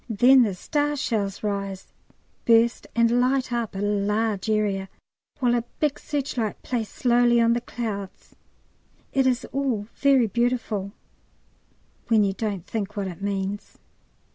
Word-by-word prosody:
Then 250 +5 +6
the 210 -6 +1
star 295 +9 -1
shells 215 -9 -2
rise, 200 -2 -3 0.6
burst, 230 0 +3
and 235 +1 +3
light 255 0 +1
up 235 -4 -2
a 195 - -3
large 210 +1 0
area, 200 -3 0 0.5
while 245 -3 +2
a 240 -1 +1 0.2
big 300 -2 0
searchlight 260 -7 -3
plays 230 -4 -2
slowly 240 -1 +3
on 230 0 +4
the 240 - -1
clouds. 205 -6 -6 0.8
It 270 -1 +3
is 250 -1 +1
all 260 -7 -1
very 275 -4 +4
beautiful 225 -3 -1 1.2
when 220 -3 +4
you 195 -1 +1
don't 200 -4 -3
think 210 -1 -4
what 200 -1 -1
it 180 +1 -10
means. 200 0 -3
225 Hz, 140 wpm, -24 LUFS, 200-245 Hz, 1.2 s, Then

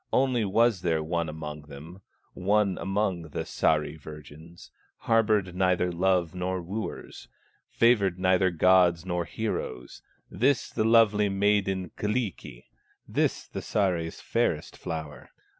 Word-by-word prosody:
Only 130 -3 +2
was 110 0 +2
there 80 -3 0
one 85 0 -2
among 75 -1 -7
them, 80 +6 -11 0.3
One 100 +1 +1
among 95 -2 -1
the - - -4
Sahri 75 0 0
virgins, 75 +3 -12 0.3
Harbored 105 -5 +2
neither 90 -1 +1
love 90 -1 +1
nor 90 +1 -2
wooers, 100 +6 -6 0.4
Favored 105 -6 +3
neither 95 0 +3
gods 90 0 +3
nor 90 -2 -2
heroes, 105 - -5 0.3
This 130 +5 0
the - - 0
lovely 110 -2 +4
maid 100 +1 +2
Kyllikki, 95 - -3 0.4
This - - 0
the - - -7
Sahri's 90 -5 -1
fairest - - -1
flower. 80 -3 -7
95 Hz, 120 wpm, -27 LUFS, 85-105 Hz, 0.4 s, lovely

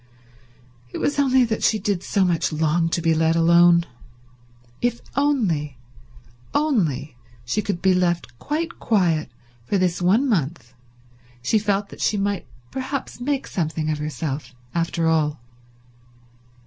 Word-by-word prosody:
It - - -6
was 285 - 0
only 260 -2 +4
that 225 -2 -1
she 220 - +3
did 200 -4 -1
so 195 0 +1
much 170 -3 +1
long 160 +2 +1
to 170 0 -1
be 165 -1 +3
let 160 +1 +2
alone. 170 +1 +5 1.0
If 240 -1 0 0.2
only, 195 - +1 0.8
only 165 - 0 0.3
she 170 - 0
could 200 -4 -3
be 190 -1 +5
left 175 -9 0
quite 325 +3 -3
quiet 175 -8 +1 0.4
for 200 - +1
this 180 -1 0
one 210 +10 +3
month, 155 - -1 0.7
she 220 - +2
felt 205 -1 0
that - - -11
she 210 - +1
might 200 -1 -1 0.2
perhaps 265 0 -4
make 275 +1 -1
something 155 -3 -2
of 150 - -2
herself 145 -3 -4 0.2
after 170 0 0
all. 155 -2 +1
175 Hz, 135 wpm, -23 LUFS, 155-220 Hz, 1.0 s, alone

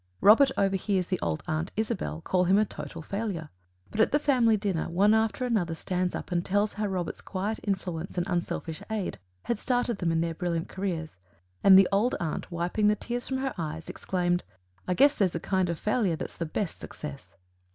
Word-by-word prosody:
Robert 225 +7 +7
overhears 195 -1 +1
the 185 0 -2
old 80 -2 -2
aunt, 160 +3 -1
Isabel, 215 -7 -2
call 180 +2 +1
him 190 +3 +4
a 215 - +4
total 165 - -7
failure, 195 -5 -4 0.4
but, 220 - +1
at - - +4
the 295 - +4
family 250 -7 +3
dinner, 195 -6 -1
one 200 +5 +4
after 220 +3 +1
another 190 -9 0
stands 180 +2 -1
up - - -6
and 175 -1 +1
tells 205 +3 +1
how 210 0 -1
Robert's 180 -4 -3
quiet 205 +3 -3
influence 185 -4 -3
and 175 - +1
unselfish 170 -3 -2
aid 215 - -3 0.2
had 235 - -1
started 245 -3 0
them 170 -2 +1
in 165 0 +1
their 165 0 -1
brilliant 170 0 -2
careers, 170 - -4 0.5
and 190 -1 +9
the 195 -1 +7
old 210 +6 +2
aunt, 165 +2 -3
wiping 175 +5 +1
the 210 - +4
tears 240 +3 -4
from 265 - -1
her 265 0 -2
eyes, 160 0 -4
exclaims: 175 -1 0 0.5
"I 180 - +1
guess 280 +5 +6
there's 190 -9 +1
a - - 0
kind 190 0 0
of 170 - -1
failure 210 -4 +1
that's 165 - -6
the 165 - -3
best 175 +3 -3
success." 145 -2 -8
190 Hz, 200 wpm, -28 LUFS, 170-215 Hz, 0.5 s, and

